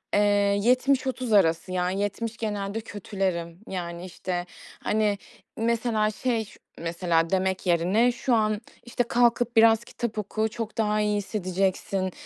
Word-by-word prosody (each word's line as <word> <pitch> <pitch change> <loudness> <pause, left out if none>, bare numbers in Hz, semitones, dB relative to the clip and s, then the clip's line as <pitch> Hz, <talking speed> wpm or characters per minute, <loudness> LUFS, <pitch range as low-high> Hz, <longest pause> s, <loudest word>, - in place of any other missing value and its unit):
eee, - - +5 0.4
70-30 255 0 +2
arası, 185 -2 +3
yani, 185 +2 0
70 225 +3 -3
genelde 210 -1 -3
kötülerim. 190 -5 -3
Yani, 175 -1 -5
işte, 180 -1 -4 0.4
hani, 210 -1 +1 0.4
mesela 225 -1 +1
şey 230 -1 -1
ş - - -17 0.2
mesela, 170 -1 +1
demek 190 0 0
yerine 185 +8 +3
şu 245 0 0
an, 215 -1 +1 0.2
işte, 240 0 0
"Kalkıp 240 0 +2
biraz 225 0 +6
kitap 235 -2 -5
oku, 215 +1 -1
çok 225 0 -6
daha 215 -1 +1
iyi 210 0 +1
hissedeceksin, 190 -1 -1
210 Hz, 130 wpm, -26 LUFS, 185-230 Hz, 0.4 s, biraz